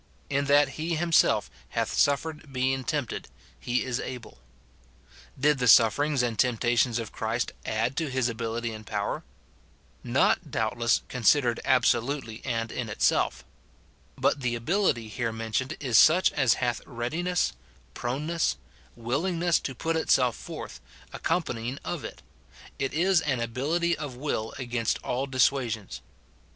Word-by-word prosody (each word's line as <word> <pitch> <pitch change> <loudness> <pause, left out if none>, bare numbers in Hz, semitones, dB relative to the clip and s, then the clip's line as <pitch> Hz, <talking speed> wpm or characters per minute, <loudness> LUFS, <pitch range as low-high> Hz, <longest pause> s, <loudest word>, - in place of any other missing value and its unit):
" - - -33
In 140 - -1
that 145 0 +5
he 165 +2 -1
him 170 +1 -2
self - - +4 0.2
hath - - -2
suffered 145 +1 0
being 130 +1 0
tempted, 145 -1 -3 0.3
he 125 +1 0
is 130 -2 -2
able." 125 - -7 1.0
Did 145 0 +3
the 125 - +1
sufferings 125 +6 +5
and 115 -3 -2
temptations 120 -1 +2
of 115 -3 -4
Christ 115 +2 -2 0.2
add 115 +4 0
to 160 -3 -1
his 130 -2 0
ability 115 0 -3
and 110 0 -8
power? 105 -1 -3 0.8
Not, - - +2
doubtless, 115 +1 +1
considered 125 0 +2
absolutely 120 -2 +1
and 115 -3 -2
in 120 -3 -4
it - - -4
itself. - - +1 0.7
But 140 - +1
the 120 -2 0
ability 120 - 0
here 115 +1 -2
mentioned 115 +3 -3
is 125 -7 +4
such 175 +4 +6
as 130 -5 +3
hath 120 -2 -1
readiness, 160 +10 -1 0.4
proneness, 145 - -1 0.4
willingness 165 +9 0
to 135 - -5
put 165 +6 -1
itself 125 -6 +2
forth, - - -8 0.3
accompanying 130 -7 -2
of - - -4
it; - - -8 0.6
it 135 - -1
is 175 +1 +3
an 130 -5 -1
ability 150 +9 0
of 145 -4 -6
will 125 -5 -3
against 120 -3 -1
all 130 +3 -2
dissuasions. 125 -5 0
125 Hz, 140 wpm, -27 LUFS, 115-145 Hz, 1.0 s, such